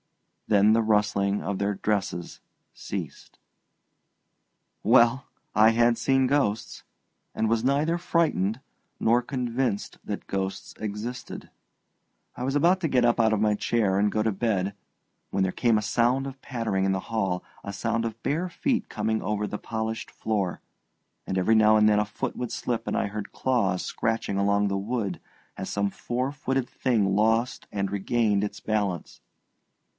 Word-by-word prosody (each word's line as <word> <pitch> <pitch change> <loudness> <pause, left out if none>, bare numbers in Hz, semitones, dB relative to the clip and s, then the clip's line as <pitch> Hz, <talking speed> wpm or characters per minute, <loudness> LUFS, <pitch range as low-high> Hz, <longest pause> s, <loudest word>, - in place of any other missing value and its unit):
Then 105 0 +5
the 115 - +4
rustling 105 -2 +1
of 100 -1 -2
their 100 0 0
dresses 100 -4 -2 0.3
ceased. - - -7 1.5
Well 120 +3 +5 0.3
I 110 +1 +7
had 120 +1 +3
seen 135 +3 +2
ghosts, 125 -6 0 0.5
and 110 - 0
was 115 0 +1
neither 145 +6 +2
frightened 160 - +1 0.4
nor 120 +2 +3
convinced 120 -3 -2
that 105 - -5
ghosts 95 0 -3
existed. 110 +4 -6 0.8
I 125 - -5
was 135 +2 -1
about 175 +6 +4
to 160 - 0
get 125 -3 +3
up 120 - +3
out 110 -1 +4
of 110 - +1
my 105 0 +3
chair 105 -2 +1
and 105 +1 +2
go 110 - +1
to 110 - +1
bed, 100 -2 0 0.6
when 95 - 0
there 95 - +1
came 115 -3 +3
a - - 0
sound 120 +5 +2
of 135 0 -9
pattering 115 -7 -1
in 95 - +2
the 95 - 0
hall, 95 -5 0 0.2
a 100 - -5
sound 115 +3 -1
of 115 -1 -5
bare 165 +6 0
feet 240 +8 -1
coming 110 0 -1
over 105 0 -1
the 105 - -5
polished 110 0 -4
floor, 100 -5 -2 0.7
and 95 - -1
every 100 +5 +3
now 110 0 +6
and 105 0 +5
then 105 -1 +4
a 105 - +1
foot 105 - -4
would 125 -2 -4
slip 115 -2 -3
and - - 0
I - - +1
heard 105 0 -5
claws 105 -9 0
scratching 110 -3 -1
along 100 +1 +2
the 100 0 -1
wood 100 -2 -3 0.3
as 95 - -5
some 100 -1 0
four 125 +6 -2
footed 135 -3 -2
thing 105 -7 +1
lost 115 +4 +1
and 100 -1 -1
regained 105 0 +1
its 105 0 -4
balance. 100 -6 -2
110 Hz, 165 wpm, -26 LUFS, 100-120 Hz, 1.5 s, I